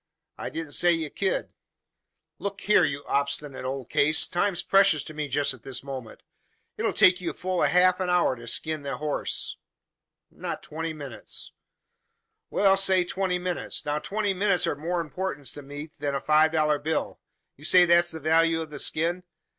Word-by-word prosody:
I - - -4
didn't 160 -2 -6
say 175 +3 +4
ye 160 -3 -3
ked." 195 -1 -1 0.9
"Look 200 0 -5
here, 210 -3 +4
you 140 - -3
obstinate 140 -1 -2
old 130 -1 -5
case! 155 +2 +4
Time's 175 -1 0
precious 195 -6 +4
to 155 - -9
me 150 -1 -3
just 145 +1 +1
at 130 - -14
this 130 +2 -4
minute. 130 -5 -8 0.5
It - - -6
'll - - +1
take 185 0 +5
you 175 - -2
a - - -5
full 185 -1 -2
half 180 +1 +4
hour 180 -6 +2
to 120 -1 -12
skin 155 +6 -1
the 140 -3 -4
horse." 150 0 -2 0.7
"Not - - -6
twenty 160 +1 -4
minutes." 145 -3 -6 1.0
"Well, 195 -1 +3
say 190 -1 +5
twenty 185 0 -1
minutes. 180 0 -3
Now, 150 0 -1
twenty 205 +4 -1
minutes 195 -1 +1
are - - 0
of 145 - -6
more 170 +3 -1
importance 165 -3 -5
to 145 - -8
me 145 +2 -8
than 145 -1 -2
a - - 0
five 155 +2 +3
dollar 150 -2 +2
bill. 160 +2 -2 0.4
You 145 - -17
say 180 +3 +6
that's 175 0 +4
the 160 - -4
value 165 +2 +3
of 160 -2 -6
the 145 - -7
skin? 170 +5 0
160 Hz, 185 wpm, -26 LUFS, 145-180 Hz, 1.0 s, say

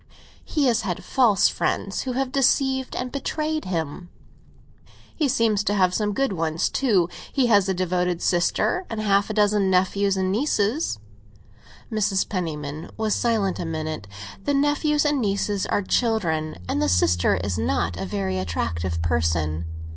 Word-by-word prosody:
"He 295 -3 0
has 240 -2 +3
had 185 -5 -4
false 230 -8 +4
friends, 195 - -1
who 255 - -3
have 260 0 -1
deceived 265 0 +1
and 250 0 -3
betrayed 305 +2 -2
him." 175 0 -4 1.1
"He 305 - +1
seems 225 -5 +2
to 205 - +1
have 185 -2 +3
some 210 +1 0
good 270 -4 0
ones 165 -1 0
too. 205 -11 +2 0.2
He 270 - +2
has 200 -1 +4
a - - +2
devoted 180 -1 0
sister, 175 - +1
and 225 - -4
half 200 -1 +2
a - - -2
dozen 205 -2 +3
nephews 190 +1 +2
and 185 0 0
nieces." 220 - 0 0.9
Mrs. 210 -3 +1
Penniman 155 -5 -4
was 220 -1 0
silent 220 -5 0
a - - -2
minute. 155 -8 -4 0.4
"The 285 - +1
nephews 290 +1 +2
and 290 -2 +2
nieces 200 -1 -1
are 205 - 0
children, 175 -10 0
and 95 - -1
the 100 - +2
sister 90 +1 +3
is 90 -3 -2
not 85 +2 0
a 95 +3 -4
very 95 -1 -2
attractive 85 -1 -2
person." 80 0 0
195 Hz, 155 wpm, -24 LUFS, 155-230 Hz, 1.1 s, false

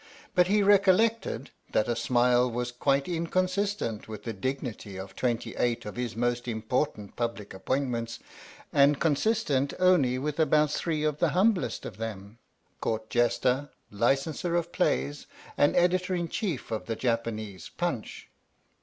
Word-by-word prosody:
But 180 -1 +4
he 205 +1 +3
recollected 205 +3 +3 0.2
that 110 - +2
a 120 - 0
smile 125 0 +3
was 120 +1 -3
quite 135 +2 +1
inconsistent 185 - -1
with 110 -2 -8
the 115 - -4
dignity 110 -3 -4
of 95 0 -8
twenty 120 -2 -1
eight 120 -3 0
of 105 - -6
his 125 -3 -3
most 120 +1 -1
im 110 -2 -3
portant 110 -4 -2
public 115 -4 -3
appointments, 115 +2 -2 0.6
and 140 0 +5
consistent 150 -3 +1
only 175 -9 +4
with 150 +3 -3
about 150 -1 +3
three 155 -1 -1
of 150 -1 0
the - - +3
humblest 200 -1 +2
of - - -7
them 110 0 -6 0.4
Court 110 -1 -3
Jester, 125 +3 +1 0.2
Licenser 135 - 0
of 170 0 -2
Plays, 145 -5 0 0.3
and 145 - +3
Editor 180 +1 +2
in 170 -2 -2
Chief 175 - -3
of 110 - -3
the 115 - -1
Japanese 110 -6 -2
Punch. - - -4
130 Hz, 145 wpm, -28 LUFS, 115-170 Hz, 0.6 s, and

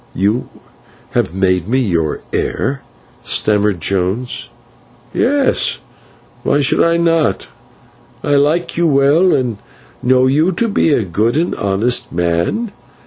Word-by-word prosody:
"You 105 +6 0 0.6
have - - 0
made 95 -2 +1
me 125 +4 +1
your 85 - -1
heir!" 135 +1 -2 0.4
stammered 105 -3 +1
Jones. 95 +8 -1 0.6
"Yes. 280 +1 +1 0.6
Why 145 - +1
should 140 - +2
I 170 0 +2
not? 165 -2 +1 0.8
I 145 - -1
like 150 +5 +1
you 170 0 +2
well, 145 +5 +3
and 120 -6 -2 0.4
know 130 +1 +3
you 155 +8 +2
to 230 +7 0
be 200 -5 +1
a 130 - +2
good 105 - 0
and 170 +2 0
honest 115 +5 0
man. 85 - -1
125 Hz, 125 wpm, -16 LUFS, 100-160 Hz, 0.8 s, well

